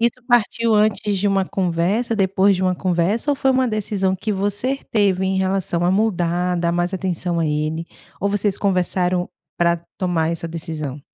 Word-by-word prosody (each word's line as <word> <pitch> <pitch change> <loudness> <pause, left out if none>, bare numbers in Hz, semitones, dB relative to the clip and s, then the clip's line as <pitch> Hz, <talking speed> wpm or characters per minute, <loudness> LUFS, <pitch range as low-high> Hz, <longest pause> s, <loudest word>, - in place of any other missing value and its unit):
Isso 235 +2 0
partiu 230 -1 +2
antes 210 -1 +2
de 205 +1 +1
uma 195 -1 +2
conversa, 190 +6 0
depois 195 0 +3
de 185 - -2
uma 185 -1 +2
conversa, 185 - 0
ou 285 - +1
foi 270 - +2
uma 260 -1 +2
decisão 200 -3 -1
que 210 +3 -2
você 205 +7 -1
teve 195 -3 +2
em 190 0 0
relação 190 -2 0
a 180 - +3
mudar, 180 -3 +1
dar 170 0 0
mais 175 +2 0
atenção 180 -2 -2
a 165 - +1
ele, 155 +2 -2 0.3
ou 200 - +1
vocês 205 -1 0
conversaram 180 -2 0 0.3
para 170 0 +2 0.2
tomar 170 -3 0
essa 170 0 -4
decisão? 155 -4 -5
190 Hz, 180 wpm, -21 LUFS, 175-205 Hz, 0.3 s, depois